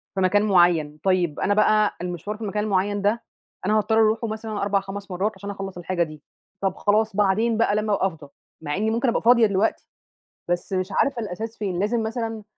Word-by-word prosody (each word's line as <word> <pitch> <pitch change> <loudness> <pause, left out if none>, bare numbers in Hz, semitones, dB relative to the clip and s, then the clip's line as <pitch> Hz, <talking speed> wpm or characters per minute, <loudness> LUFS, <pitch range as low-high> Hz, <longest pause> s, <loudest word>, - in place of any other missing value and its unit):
في 190 - 0
مكان 205 +3 +3
معيّن، 175 -6 +3
طيب 180 -5 +1
أنا 205 - +2
بقى 215 0 +3
المشوار 180 +4 -4
في - - -17
المكان 210 0 -2
المعيّن 205 0 0
ده 210 +3 +1 0.4
أنا 215 +2 +3
هاضطر 220 +1 +1
أروحه 220 +1 +2
مثلًا 220 -1 -4
4 200 0 +2
5 195 0 -8
مرات 195 +4 0
عشان 200 +1 -8
أخلّص 195 -2 -6
الحاجة 175 0 -1
دي، 155 -2 -9 0.4
طَب 190 -1 0
خلاص 215 0 +1
بعدين 210 +3 +2
بقى 225 -2 +2
لمّا 215 0 0
ابقى 190 - +2
أفضى، 160 -6 -10 0.3
مع 145 -2 -3
إني 215 +3 0
ممكن 235 +2 +1
أبقى 235 - 0
فاضية 235 -1 +6
دلوقتي، 200 +2 0 0.6
بس 175 +2 -2
مش 185 0 0
عارفة 250 +4 +1
الأساس 220 +3 -5
فين 190 -4 -3
لازم 225 +3 0
مثلًا، 225 -1 -4
205 Hz, 200 wpm, -23 LUFS, 185-220 Hz, 0.6 s, فاضية